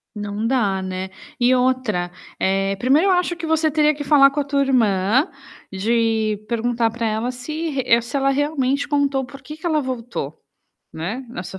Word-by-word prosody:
Não 205 +1 -4
dá, 215 -7 +1
né. 185 0 -4 0.3
E 250 +1 +4
outra, 250 -9 0 0.3
eh, 195 +1 +1
primeiro 285 - +3
eu - - +4
acho 355 -1 +1
que 330 -1 -6
você 315 -1 +2
teria 300 0 +3
que 290 - -5
falar 275 -1 +6
com 290 +2 -3
a - - -1
tua 280 0 0
irmã, 235 - +2 0.4
de 220 +1 +1
perguntar 235 -1 0
para 230 0 -3
ela 220 +3 -1
se 310 +6 -4
re 255 -4 +2
se 235 +4 -8
ela 275 0 +2
realmente 280 -1 0
contou 280 -2 +1
por 275 +1 -12
que 305 +4 -9
que 325 - -11
ela 310 -3 +2
voltou, 235 - -5 0.5
né, 205 +12 -4
na 185 - -6
sua 190 +1 -8
255 Hz, 185 wpm, -21 LUFS, 215-285 Hz, 0.5 s, falar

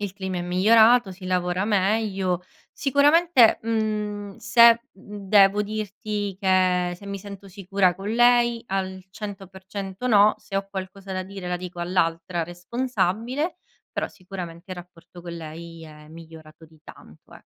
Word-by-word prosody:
il 200 -2 -4
clima 190 -2 -4
è - - -3
migliorato, 220 +4 +4
si 185 0 -10
lavora 180 0 0
meglio. 195 -3 0 0.3
Sicuramente, 285 -1 +4
mhmm, 210 -2 -2
se 235 +1 +6
mhmm, 200 0 -11
devo 200 0 +5
dirti 210 -1 -4
che 185 -2 +2
se 200 - -13
mi 200 0 -5
sento 200 0 -10
sicura 190 -1 0
con 195 +3 -7
lei: 240 0 +3
al 190 -1 -3
100% 195 +1 -7
no. 210 -3 +5
Se 210 -2 -6
ho 195 0 -2
qualcosa 195 0 -7
da 185 0 -2
dire 195 -1 -9
la 180 0 -1
dico 180 -1 -8
all'altra 170 -1 -1
responsabile, 235 - -2 0.4
però - - -2
sicuramente 180 -1 -9
il 185 - -5
rapporto 175 0 -13
con 170 -1 -8
lei 165 +1 -9
è 150 -1 -14
migliorato 160 -1 -13
di 160 -1 -21
tanto, 75 - -16
eh. - - -15
195 Hz, 145 wpm, -24 LUFS, 180-215 Hz, 0.4 s, se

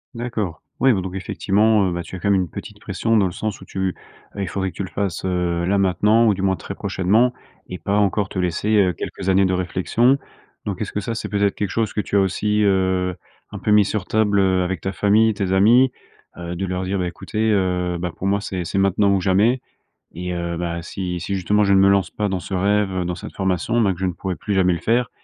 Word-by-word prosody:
D'accord, 115 -8 -4 0.2
oui, 135 - +5
bah 100 -5 +1
donc, 90 0 -6
effectivement, 100 +2 +2
heu - - -1
bah, 85 - -3
tu 90 - -9
as - - -6
quand 100 +3 +1
même 95 - +3
une 90 - -4
petite - - -9
pression 115 0 -1
dans 100 -3 +4
le 90 - -4
sens 110 +3 -4
où, - - -11
tu, - - -11
heu, - - -5 0.5
il 95 - -2
faudrait 95 +1 -2
que - - -25
tu - - -2
le 95 - -6
fasses, 100 -4 -3
heu, 90 -2 -1
là 100 +3 +2
maintenant, 105 +4 +3
ou 105 - +4
du 95 - -5
moins 95 -1 +2
très 100 - -7
prochainement, 100 +5 +1 0.4
et 90 - -6
pas 100 +3 -1
encore 100 0 +1
te 95 - -5
laisser, 90 +3 -1
heu, 95 -3 +3
quelques 95 0 -5
années 95 +1 +4
de 95 - +1
réflexion. 95 +8 +1 0.5
Donc 100 -1 -4
est-ce 105 - -3
que 105 - -2
ça, 115 +3 -3
c'est 115 - -5
peut-être 100 -1 +1
quelque 100 - -2
chose 110 +2 -1
que 105 - 0
tu 100 - -4
as - - +5
aussi, 105 +2 +1
heu, 95 -2 +1 0.4
un - - -7
peu - - -3
mis 105 -1 +6
sur 100 -2 -2
table, 105 -2 +2
heu, 95 -1 +2
avec 90 -1 -3
ta 95 - -2
famille, 105 +2 +3
tes 95 -2 -2
amis? 115 +7 +5 0.5
Heu, 85 0 -5
de 95 - -3
leur 90 0 -3
dire: 100 +2 -1
«Bah 90 - -1
écoutez, 110 +5 -2
heu, 90 -3 0
bah, 90 -1 -3
pour 95 - -6
moi 100 +1 +1
c'est 95 -3 -4
c'est 90 - -3
maintenant 100 +1 +3
ou 95 - 0
jamais 105 +7 +2 0.5
et 90 +2 -5
heu, 85 -1 -3
bah, 85 -1 -3
si 90 +1 -4
si 100 - -3
justement, 105 +3 +2
je 100 - +2
ne - - +5
me 95 0 +6
lance 100 -3 +2
pas 105 -1 -2
dans 95 -2 -2
ce 85 - -9
rêve, 95 -1 +1
dans 90 - -2
cette 85 - -9
formation, 95 +5 0
bah 100 -4 +3
que 85 - -15
je 95 - 0
ne 90 - -1
pourrais 95 +1 -4
plus 105 - -4
jamais 95 -1 +3
le - - -5
faire» 120 0 +1
95 Hz, 260 wpm, -21 LUFS, 90-105 Hz, 0.5 s, mis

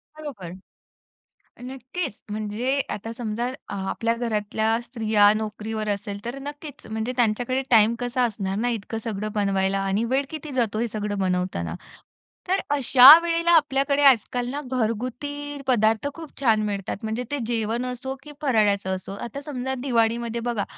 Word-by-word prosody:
बरोबर, 270 - -8 1.1
नक्कीच. 265 - -5 0.2
म्हणजे 215 +6 -1
आता 225 +3 -5
समजा 235 +1 -2
अ, 255 -5 -8 0.2
आपल्या 230 0 0
घरातल्या 220 -1 0
स्त्रिया 220 -4 +3
नोकरीवर 215 0 -4
असेल 200 0 -3
तर 240 +3 -4
नक्कीच 290 0 -8
म्हणजे 220 +3 -3
त्यांच्याकडे 245 +3 +1
टाईम 225 +1 +6
कसा 245 +1 0
असणार 195 -4 -2
ना 240 +3 0
इतकं 225 -1 -3
सगळं 215 -1 -3
बनवायला 195 -1 +1
आणि 195 +3 0
वेळ 275 +1 +2
किती 310 -1 -7
जातो 225 -4 0
हे 235 - 0
सगळं 210 -1 -3
बनवताना. 180 - -1 0.7
तर 380 +2 +2
अशा 265 -2 +6 0.2
वेळेला 335 0 +1
आपल्याकडे 285 -3 +3
आजकाल 245 -1 +3
ना 285 +2 -3
घरगुती 255 +5 -3
पदार्थ 225 0 +2
खूप 325 -2 -11
छान 225 -5 +3
मिळतात. 200 -2 -3
म्हणजे 220 +3 -2
ते 290 - 0
जेवण 230 +1 -1
असो 255 +1 -4
की 300 - -11
फराळ्याचं 205 -8 +2
असो 185 +1 -8
आता 275 +4 -7
समजा 265 -3 -4
दिवाळीमध्ये 235 -2 0
बघा 235 -3 -1
230 Hz, 145 wpm, -24 LUFS, 210-265 Hz, 1.1 s, टाईम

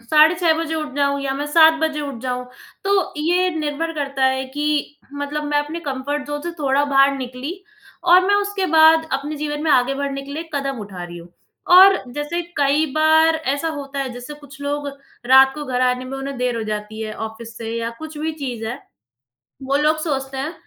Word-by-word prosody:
साढ़े 310 +6 +5
6 340 -2 +2
बजे 320 -1 -2
उठ 305 -3 -4
जाऊँ 280 0 +1
या 270 -1 -2
मैं 290 +2 -3
7 320 +1 +6
बजे 310 -1 0
उठ 280 -5 -5
जाऊँ, 250 -1 -3 0.4
तो 395 -1 +1
ये 355 +4 +1
निर्भर 310 +2 -2
करता 275 -3 -1
है 265 0 +1
कि 295 0 -1
मतलब 285 +1 -4
मैं 295 0 +1
अपने 300 +3 -3
कम्फ़र्ट 285 +2 -3
ज़ोन 290 0 -4
से 345 - -3
थोड़ा 280 0 +2
बाहर 275 -1 +3
निकली 260 +7 -6 0.5
और 365 +1 +6
मैं 405 - +3
उसके 405 -1 0
बाद 320 0 +6
अपने 290 +3 -2
जीवन 295 0 -3
में 320 - +1
आगे 255 0 +3
बढ़ने 275 0 -3
के 280 +1 -9
लिए 325 +3 -6
कदम 275 -2 -2
उठा 195 -3 -8
रही 175 0 -9
हूँ। 170 - -12 0.5
और 385 +1 +9 0.2
जैसे 295 +5 -3 0.2
कई 285 +2 +3
बार 315 +1 +4 0.2
ऐसा 285 +3 -2
होता 280 -1 -6
है 270 -1 -2
जैसे 245 +4 -8
कुछ 285 -2 -15
लोग, 285 0 -3 0.4
रात 265 +1 +7
को 300 - -6
घर 255 -2 -2
आने 250 0 +1
में 265 +1 -6
उन्हें 275 0 -5
देर 250 -1 0
हो 225 - -2
जाती 215 0 -5
है 215 -1 -5
ऑफ़िस 225 +1 -11
से 225 -1 -5
या 230 0 -2
कुछ 315 -1 -8
भी 320 +1 -2
चीज़ 255 -7 -5
है, 240 +4 -4 0.8
वो 270 +1 0
लोग 305 +2 +2
सोचते 270 -4 -3
हैं, 290 +5 -3
285 Hz, 210 wpm, -20 LUFS, 265-310 Hz, 0.8 s, और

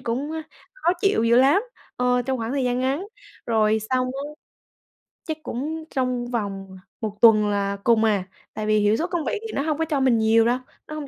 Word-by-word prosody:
cũng 255 +5 -3 0.4
khó - - +1
chịu 390 - +2
dữ 235 +1 +4
lắm, 280 - +5 0.3
ờ, 250 0 +2
trong 260 +1 -2
khoảng 225 0 -3
thời 275 -2 0
gian 245 0 0
ngắn. 275 +9 -1 0.4
Rồi 220 -1 +2
xong 255 0 +1
á 270 +2 -5 1.1
chắc 315 -1 -3
cũng 310 +6 -4
trong 255 -2 -1
vòng 200 -4 -3 0.3
1 210 -2 -4
tuần 215 -2 +6
là 200 -1 -1
cùng 230 -2 +4
à, 210 -4 +2 0.3
tại 215 - -4
vì 215 0 +3
hiệu 205 +1 +3
suất 340 +3 -2
công 340 -3 -2
việc - - -1
thì - - -8
nó - - -1
hông 300 0 -1
có 325 - 0
cho 305 -3 -1
mình 260 -3 +3
nhiều 225 +1 +4
đâu, 240 +2 +2 0.3
nó 305 - -7
hông 300 -2 -6
250 Hz, 210 wpm, -23 LUFS, 220-285 Hz, 1.1 s, tuần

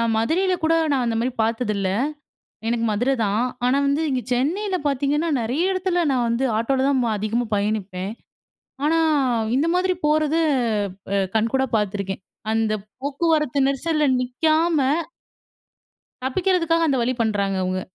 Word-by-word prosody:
மதுரையில 350 +12 +1
கூட 325 +1 +3 0.2
நான் 260 -3 +1
அந்த 230 -1 -1
மாதிரி 245 +2 -1
பாத்ததில்ல 215 -4 -1 0.8
எனக்கு 230 0 0
மதுரை 245 +6 +1
தான். 205 +3 0 0.2
ஆனா 255 +2 +3
வந்து 285 +3 +1
இங்க 260 -2 0
சென்னையில 365 +11 0
பார்த்தீங்கன்னா, 290 +3 0
நிறைய 250 +9 -1
இடத்துல 365 -2 0
நான் 250 -2 +1
வந்து 235 +3 0
ஆட்டோவில 260 +4 +1
தான் 265 -3 +2
வ - - 0
அதிகமா 225 +4 -1
பயணிப்பேன். 200 -2 -2 0.7
ஆனா 325 +2 +3 0.6
இந்த 290 +5 +2
மாதிரி 370 0 +2
போறது 305 +1 +2 0.7
அ 200 - +2 0.2
கண்கூடா 245 +5 +1
பார்த்துருக்கேன். 200 -2 -3 0.3
அந்த 220 -1 +1 0.3
போக்குவரத்து 290 0 0
நெரிசல்ல 305 +3 0 0.2
நிக்காம. 310 +5 +1 1.5
தப்பிக்கிறதுக்காக 330 +2 +1
அந்த 275 - +2
வழி 250 +2 +1
பண்றாங்க 200 -3 0
அவங்க. 185 0 -1
265 Hz, 130 wpm, -22 LUFS, 225-315 Hz, 1.5 s, கூட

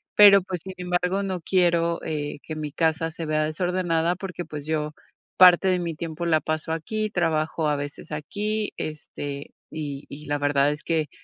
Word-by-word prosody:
Pero, 200 -2 +9
pues, 180 -2 -5
sin 190 - -7
embargo, 180 +2 0
no 190 -2 -2
quiero, 170 -2 +2
eh, 145 -2 -3
que 155 - -6
mi 150 -2 -4
casa 165 +1 +1
se 165 0 -5
vea 155 0 +1
desordenada, 175 +1 0
porque, 180 -1 -5
pues, 150 -3 -7
yo, 150 -1 -1 0.4
parte 185 +1 +8
de 185 -1 +3
mi 170 -2 -2
tiempo, 165 +1 -5
la 160 -2 +3
paso 155 0 -2
aquí, 215 +6 -2
trabajo 160 -3 0
a 150 - +2
veces 145 +1 -6
aquí. 205 +8 -2
Este, 145 -2 -6 0.2
y 145 -2 -5
y 150 +2 -9
la 145 0 -1
verdad 145 0 +3
es 150 0 -6
que, 155 -3 0
165 Hz, 180 wpm, -25 LUFS, 150-180 Hz, 0.4 s, Pero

